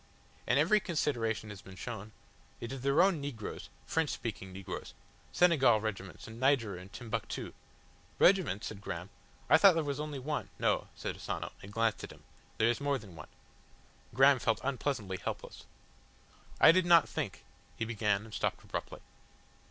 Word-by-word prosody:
"And 125 - +3
every 180 +9 +4
consideration 115 - -1
has 100 -3 -9
been 95 - -12
shown. 110 0 -7 0.5
It 115 - -6
is 135 -1 -5
their 140 +6 +4
own 190 -6 +2
negroes 130 -7 -6 0.2
French 160 -2 0
speaking 95 -5 -5
negroes. 95 0 -7 0.4
Senegal 155 -10 +5
regiments, 100 -3 -5
and 110 +1 -10
Niger 130 -7 +2
and 90 +2 -10
Timbuctoo." 115 -4 -5 0.6
"Regiments?" 175 - +4
said 100 -2 -6
Graham, 90 0 -6 0.4
"I 160 - +6
thought 190 0 +7
there 165 - +1
was 140 -1 -3
only 150 -1 -4
one 145 +3 -3
" - - -29
"No," - - +1
said - - -5
Asano, - - -4
and 100 - -10
glanced 115 0 0
at - - -7
him. - - -16 0.3
"There 110 - +3
is 120 +3 +1
more 140 -1 +1
than 100 -8 -12
one." 75 - -10 0.8
Graham 135 +2 +5
felt 115 - +1
unpleasantly 130 -8 -2
helpless. - - -6 0.9
"I - - +9
did 185 +1 +2
not 170 -3 +7
think," - - -4 0.3
he 115 - -2
began 105 -2 0
and 110 - -13
stopped - - -1
abruptly. - - -6
120 Hz, 170 wpm, -32 LUFS, 105-145 Hz, 0.9 s, I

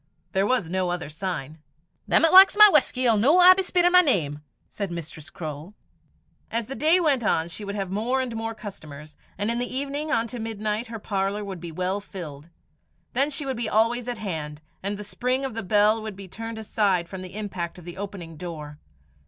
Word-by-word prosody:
There 190 +3 +1
was 250 -9 +1
no 185 +1 -1
other 175 -4 -3
sign. 155 -3 -5 0.5
"Them - - +4
'at 325 - +2
likes 385 +2 +9
my 425 0 +11
whusky 260 -5 +2
'ill 230 -3 +4
no 275 - +4
aye 365 0 +9
be 385 - -1
speirin' 355 -1 +2
my 360 0 +8
name," 155 - 0 0.3
said 200 -2 -4
Mistress 165 -1 -7
Croale. 155 +2 -7 0.7
As 230 0 -2
the 265 - -7
day 315 +6 +3
went 285 -8 +2
on 165 -5 +1
she 205 - -7
would 200 0 -5
have 195 -2 -3
more 230 +6 0
and 250 -3 -3
more 225 0 -4
customers, 155 -8 -10 0.2
and 205 +3 0
in 235 - -1
the 245 - -3
evening 285 +3 -3
on 230 -5 +2
to 245 - -6
midnight, 215 0 -3
her 225 0 -6
parlour 200 0 -2
would 190 -3 -6
be 170 -1 -7
well 185 +4 -2
filled. 165 -7 -9 0.6
Then 275 +4 +2
she 295 0 -4
would 265 -3 -3
be 235 - -2
always 230 +3 +1
at 240 - -3
hand, 155 -8 -5 0.2
and 200 +1 -2
the 210 - -7
spring 255 +6 -1
of 265 - -4
the 225 - -4
bell 210 +2 +3
would 215 -2 -6
be 195 0 -10
turned 225 +4 -7
aside 200 -5 0
from 190 +1 -7
the 185 +1 -9
impact 185 -5 -5
of 175 - -13
the 175 +1 -9
opening 190 -5 -7
door. 150 -4 -7
210 Hz, 215 wpm, -25 LUFS, 175-245 Hz, 0.7 s, my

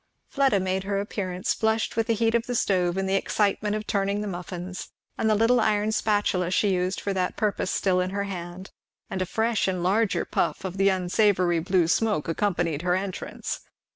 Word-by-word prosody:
Fleda 270 -8 +3
made 190 0 -1
her 200 0 -1
appearance 190 -3 -2
flushed 220 0 0
with 225 -1 0
the 230 - +2
heat 225 +1 +1
of 235 0 +1
the 245 - -2
stove 180 -4 +1
and 195 0 0
the 190 - 0
excitement 205 +1 +1
of 215 0 -4
turning 200 0 0
the 210 - -3
muffins, 180 0 -6 0.3
and 220 - 0
the 215 - +4
little 230 +3 +4
iron 210 0 +2
spatula 205 -5 +1
she 195 +1 +2
used 185 +1 -1
for 200 - -2
that 185 -1 -1
purpose 210 -3 0
still 185 -2 +1
in 180 - -1
her 200 +1 -2
hand; 185 -1 -7 0.4
and 190 - -2
a 185 - -1
fresh 225 +1 0
and 185 -2 -1
larger 200 +4 +1
puff - - -1
of 190 0 -5
the 195 +1 +4
unsavoury 185 -1 +2
blue 180 0 +2
smoke 210 -3 +1
accompanied 170 -3 0
her 180 0 +1
entrance. 190 0 -4
195 Hz, 200 wpm, -26 LUFS, 180-210 Hz, 0.4 s, the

